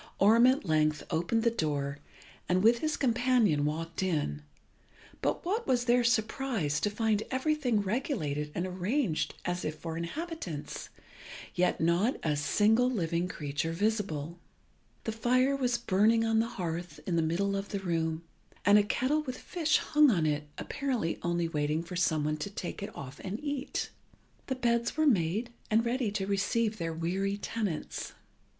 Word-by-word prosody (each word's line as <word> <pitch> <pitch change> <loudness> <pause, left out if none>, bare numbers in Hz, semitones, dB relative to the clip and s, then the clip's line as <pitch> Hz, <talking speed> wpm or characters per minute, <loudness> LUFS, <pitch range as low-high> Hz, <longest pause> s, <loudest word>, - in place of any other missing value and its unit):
Orm 225 +5 +6
at 260 -3 +2
length 155 -2 +2
opened 175 +8 +1
the 235 - +3
door, 145 -7 -2 0.5
and 185 +1 +3
with 230 +2 +5
his 310 +2 -1
companion 240 - +3
walked 165 +3 -3
in; 150 - -1 0.8
but - - -1
what 430 +6 -1
was 245 -1 +2
their 245 0 +4
surprise 220 - 0
to 205 - +1
find 215 0 +1
everything 260 -4 +1
regulated 190 - -2
and 175 - -1
arranged 185 - -1
as 180 0 -2
if 155 - -2
for 165 -1 -5
inhabitants, 180 - -5 0.6
yet 180 0 +1
not 170 +9 +2
a 150 -2 +1
single 215 - +3
living 170 -6 0
creature 150 -1 -3
visible. 175 -5 -1 0.6
The 225 - -2
fire 255 +5 +2
was 250 -3 +1
burning 225 +1 +3
on 225 0 +3
the 225 - +2
hearth 175 -5 -5
in 175 - 0
the 165 - +3
middle 185 +5 0
of 195 0 -3
the 200 - -2
room, 165 -3 -1 0.4
and 205 +1 +7
a - - +4
kettle 260 +8 +1
with 255 -4 -5
fish 320 -4 +1
hung 300 -1 +4
on 170 -9 +2
it, 150 -1 -1
apparently 255 - -2
only 170 -1 0
waiting 150 0 -1
for 180 +2 -7
some 160 -4 +1
one 150 +1 0
to 155 +6 -4
take 200 -2 -6
it 200 - -4
off 140 0 -8
and 200 +3 -4
eat. 285 -1 -3 0.6
The 260 - -1
beds 235 0 0
were 310 - +3
made 215 - +2 0.2
and 225 +2 +3
ready 240 -1 0
to 195 -2 -1
receive 210 +2 0
their 165 -1 -2
weary 190 +5 -1
tenants. 205 -6 -3
200 Hz, 165 wpm, -30 LUFS, 165-240 Hz, 0.8 s, and